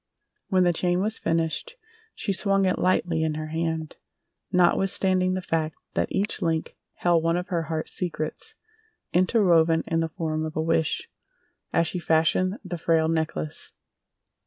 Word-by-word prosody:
When 185 -2 +3
the 175 -1 +3
chain 175 +1 +1
was 215 +3 -1
finished 165 - -1 0.4
she 200 - -1
swung 195 0 +2
it 185 - +1
lightly 175 -3 +1
in 160 -1 0
her 155 0 -5
hand, 160 -1 -3 0.5
notwithstanding 185 0 +3
the 185 - -3
fact 160 -2 -1 0.2
that - - -1
each 205 +2 -1
link 160 -1 -1 0.2
held 175 -2 +2
one 165 +1 +1
of 180 - -4
her 170 -2 0
heart 160 -1 -2
secrets 180 - -4 0.6
interwoven 175 -4 +4
in 165 - 0
the 165 0 0
form 155 -2 -2
of 155 0 -5
a 155 - 0
wish, 160 -1 0 0.6
as 165 - +2
she 175 +3 -2
fashioned 170 +4 +2
the 175 -2 -5
frail 160 -1 +2
necklace. 155 - -3
165 Hz, 155 wpm, -25 LUFS, 160-185 Hz, 0.6 s, interwoven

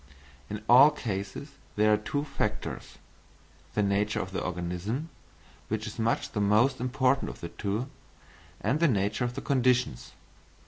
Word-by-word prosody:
In 105 0 -5
all 130 +5 +9
cases 105 -1 -5 0.2
there 105 +1 +4
are - - +4
two 145 +7 -2
factors, 135 -7 -4 0.8
the 105 - +2
nature 100 +2 +1
of 95 - -4
the 95 - -3
organism, 90 - -3 0.6
which - - -2
is - - -7
much 115 +1 0
the 105 - -1
most 110 +6 +3
important 130 +1 +1
of - - -9
the 85 - -6
two, 105 +8 -3 0.7
and 125 +9 +1
the 170 - +4
nature 105 0 +1
of 120 0 -4
the 140 - -4
conditions. 125 - +1
110 Hz, 150 wpm, -28 LUFS, 100-130 Hz, 0.8 s, all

